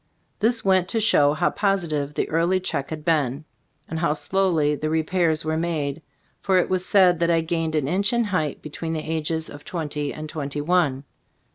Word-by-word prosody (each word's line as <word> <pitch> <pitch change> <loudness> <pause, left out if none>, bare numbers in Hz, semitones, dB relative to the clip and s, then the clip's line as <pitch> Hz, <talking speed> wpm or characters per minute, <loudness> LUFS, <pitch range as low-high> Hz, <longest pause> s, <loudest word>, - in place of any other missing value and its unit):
This 225 +1 +1
went 190 -2 +3
to 225 - -1
show 145 -9 +4
how - - +1
positive 165 -8 -1
the - - 0
early 170 +4 +2
check 155 -7 -3
had 155 -1 -6
been, 150 -3 0 0.4
and 160 - -4
how 170 -3 +1
slowly 160 -1 +1
the 155 +1 -2
repairs 160 0 +1
were 160 0 0
made, 160 -3 -2 0.4
for 190 -1 +2
it 180 - +2
was 185 -1 +1
said 185 -3 +4
that 170 0 +2
I 165 -1 +3
gained 160 -1 -2
an 150 -3 0
inch 195 +6 +1
in 235 -1 +2
height 170 -9 -2
between 160 +2 -5
the 155 -1 -4
ages 160 0 -1
of 145 0 -10
twenty 150 -4 -3
and 155 0 -7
twenty 145 -2 -4
one. 145 -4 +1
160 Hz, 190 wpm, -23 LUFS, 150-180 Hz, 0.4 s, show